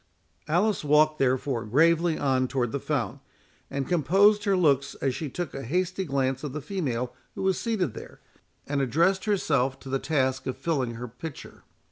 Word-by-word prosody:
Alice 180 Hz, +6 st, +1 dB
walked, 155 Hz, +1 st, +4 dB
therefore, 130 Hz, -2 st, +1 dB
gravely 165 Hz, +7 st, +3 dB
on 130 Hz, -2 st, +1 dB
toward 125 Hz, -3 st, -1 dB
the 140 Hz, -, -2 dB
fount, 130 Hz, -9 st, -2 dB, 0.5 s
and 135 Hz, -1 st, -3 dB
composed 195 Hz, +6 st, +4 dB
her 195 Hz, -2 st, +3 dB
looks 140 Hz, -5 st, +2 dB
as 135 Hz, -2 st, -1 dB
she 150 Hz, +2 st, -4 dB
took 175 Hz, +4 st, -5 dB
a 135 Hz, -, -5 dB
hasty 185 Hz, +8 st, -1 dB
glance 135 Hz, -2 st, -1 dB
of 145 Hz, -3 st, -4 dB
the 150 Hz, -, -3 dB
female 130 Hz, -10 st, -3 dB, 0.2 s
who -, -, -4 dB
was 190 Hz, -1 st, +1 dB
seated 205 Hz, -, -1 dB
there, -, -, -10 dB, 0.5 s
and 140 Hz, -1 st, -1 dB
addressed 170 Hz, -, +2 dB
herself 135 Hz, -11 st, +1 dB
to 135 Hz, -, -9 dB
her 135 Hz, -, +1 dB
task 130 Hz, -4 st, 0 dB
of 130 Hz, -, -3 dB
filling 135 Hz, -8 st, -1 dB
her 120 Hz, +2 st, -6 dB
pitcher. 130 Hz, +6 st, -9 dB
145 Hz, 175 wpm, -27 LUFS, 130-175 Hz, 0.5 s, walked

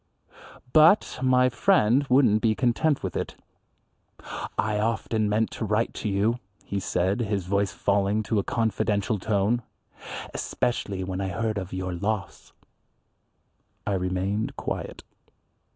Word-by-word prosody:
But 160 Hz, +6 st, +5 dB
my 130 Hz, -1 st, +4 dB
friend 135 Hz, -, +3 dB
wouldn't 125 Hz, -5 st, +4 dB
be 110 Hz, -2 st, +2 dB
content 135 Hz, +5 st, +1 dB
with 95 Hz, -3 st, -3 dB
it. -, -, -3 dB, 1.2 s
"I 105 Hz, -1 st, +1 dB
often 110 Hz, -1 st, 0 dB
meant 110 Hz, +1 st, +1 dB
to -, -, -5 dB
write 105 Hz, +2 st, 0 dB
to 105 Hz, -, -1 dB
you," 105 Hz, +5 st, +1 dB, 0.3 s
he 100 Hz, -, -2 dB
said, 95 Hz, +3 st, 0 dB
his 100 Hz, -5 st, -1 dB
voice 100 Hz, +1 st, +1 dB
falling 100 Hz, +1 st, +1 dB
to 110 Hz, 0 st, 0 dB
a -, -, 0 dB
confidential 110 Hz, -1 st, 0 dB
tone, 105 Hz, +4 st, +1 dB, 0.7 s
"especially 100 Hz, -6 st, -2 dB
when 95 Hz, +1 st, -3 dB
I 95 Hz, -, -1 dB
heard 110 Hz, +1 st, -1 dB
of 95 Hz, -1 st, -7 dB
your 95 Hz, -1 st, -3 dB
loss." 100 Hz, +3 st, -3 dB, 1.3 s
I 100 Hz, -, 0 dB
remained 95 Hz, +3 st, -1 dB
quiet. -, -, -5 dB
105 Hz, 130 wpm, -26 LUFS, 100-115 Hz, 1.3 s, But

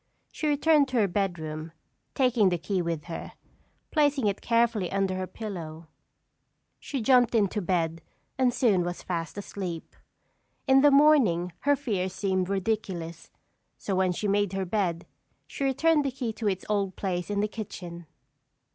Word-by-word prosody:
She 310 Hz, -, -3 dB
returned 295 Hz, 0 st, +4 dB
to 255 Hz, -, -2 dB
her 210 Hz, -3 st, +4 dB
bedroom, 165 Hz, -5 st, -3 dB, 0.4 s
taking 245 Hz, -7 st, +3 dB
the 175 Hz, -, 0 dB
key 185 Hz, +2 st, -1 dB
with 165 Hz, -3 st, -3 dB
her. 170 Hz, 0 st, -7 dB, 0.6 s
Placing 290 Hz, -5 st, +2 dB
it 200 Hz, -1 st, 0 dB
carefully 230 Hz, -5 st, +1 dB
under 195 Hz, -1 st, 0 dB
her 185 Hz, 0 st, -3 dB
pillow 170 Hz, -6 st, -7 dB, 0.9 s
she 270 Hz, -5 st, -4 dB
jumped 245 Hz, -2 st, +4 dB
into 210 Hz, -1 st, +1 dB
bed 165 Hz, -3 st, -1 dB, 0.3 s
and 260 Hz, -2 st, +2 dB
soon 220 Hz, -7 st, +2 dB
was 175 Hz, 0 st, -5 dB
fast 170 Hz, +1 st, -4 dB
asleep. 190 Hz, -4 st, -6 dB, 0.7 s
In 270 Hz, 0 st, +5 dB
the 290 Hz, -, +7 dB
morning 275 Hz, -, +4 dB
her 285 Hz, 0 st, +3 dB
fears 200 Hz, -10 st, -2 dB
seemed 190 Hz, -1 st, -1 dB
ridiculous, 190 Hz, -5 st, -3 dB, 0.5 s
so 200 Hz, -, -4 dB
when 185 Hz, -1 st, +2 dB
she 205 Hz, +4 st, -2 dB
made 205 Hz, -1 st, +1 dB
her 190 Hz, 0 st, -1 dB
bed, 175 Hz, -3 st, -1 dB, 0.4 s
she -, -, -6 dB
returned 295 Hz, +3 st, +3 dB
the 275 Hz, -, 0 dB
key 245 Hz, -3 st, -4 dB
to 215 Hz, 0 st, -3 dB
its 190 Hz, -1 st, -3 dB
old 200 Hz, -3 st, -1 dB
place 180 Hz, -2 st, -3 dB
in 205 Hz, -1 st, -1 dB
the 210 Hz, -, +1 dB
kitchen. 175 Hz, -6 st, -8 dB
200 Hz, 155 wpm, -27 LUFS, 180-240 Hz, 0.9 s, the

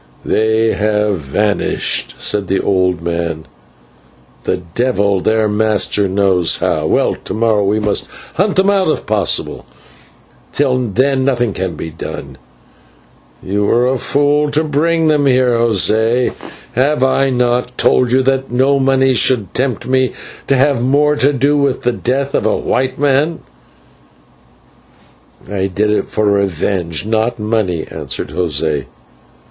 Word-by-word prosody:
"They 110 Hz, +1 st, +1 dB
have 105 Hz, -1 st, 0 dB
vanished," 100 Hz, +8 st, -1 dB
said 105 Hz, -2 st, -1 dB
the 95 Hz, -, 0 dB
old 90 Hz, -3 st, 0 dB
man, 85 Hz, -2 st, -3 dB, 1.0 s
"the 95 Hz, -, 0 dB, 0.2 s
devil 100 Hz, -6 st, +1 dB
their 110 Hz, +3 st, +1 dB
master 105 Hz, -1 st, +1 dB
knows 95 Hz, -3 st, +1 dB
how. -, -, -1 dB
Well, -, -, +1 dB
to -, -, -5 dB
morrow 110 Hz, -2 st, +1 dB
we 105 Hz, +2 st, +1 dB
must 105 Hz, -1 st, -1 dB, 0.3 s
hunt 195 Hz, +3 st, 0 dB
them 195 Hz, +1 st, +3 dB
out 195 Hz, -2 st, +1 dB
if 155 Hz, -, -1 dB
possible, 105 Hz, -3 st, -1 dB, 0.9 s
till 130 Hz, -3 st, +1 dB
then 130 Hz, +5 st, +1 dB
nothing 120 Hz, -5 st, 0 dB
can 95 Hz, -1 st, -3 dB
be 80 Hz, -, -6 dB
done. 70 Hz, -4 st, -8 dB, 1.0 s
You 100 Hz, +2 st, -1 dB
were 120 Hz, +4 st, +2 dB
a 130 Hz, 0 st, 0 dB
fool 145 Hz, +2 st, +1 dB
to 150 Hz, +2 st, +1 dB
bring 160 Hz, +2 st, +1 dB
them 150 Hz, -2 st, +2 dB
here, 130 Hz, -1 st, +3 dB
José. 115 Hz, +2 st, +1 dB, 0.4 s
Have 130 Hz, +2 st, +1 dB
I 135 Hz, +1 st, +2 dB
not 125 Hz, 0 st, 0 dB
told 125 Hz, -2 st, +2 dB
you 130 Hz, +1 st, +3 dB
that 135 Hz, 0 st, 0 dB
no 135 Hz, +3 st, +2 dB
money 135 Hz, 0 st, +2 dB
should 115 Hz, -4 st, +1 dB
tempt 130 Hz, -3 st, -1 dB
me 130 Hz, 0 st, +1 dB, 0.3 s
to 135 Hz, -, +2 dB
have 135 Hz, -2 st, +2 dB
more 145 Hz, +3 st, +2 dB
to 140 Hz, +1 st, +3 dB
do 140 Hz, +2 st, +1 dB
with 140 Hz, -2 st, 0 dB
the 125 Hz, -, +1 dB
death 135 Hz, +4 st, -2 dB
of -, -, 0 dB, 0.2 s
white 130 Hz, 0 st, 0 dB
men?" 145 Hz, +3 st, +1 dB, 2.1 s
"I 95 Hz, -1 st, -2 dB
did 105 Hz, +3 st, 0 dB
it 105 Hz, -, 0 dB
for 110 Hz, -, -1 dB
revenge, 95 Hz, -3 st, 0 dB
not 110 Hz, +2 st, 0 dB
money," 105 Hz, -6 st, -1 dB
answered -, -, -4 dB
José. 75 Hz, -4 st, -2 dB
115 Hz, 140 wpm, -15 LUFS, 100-135 Hz, 2.1 s, them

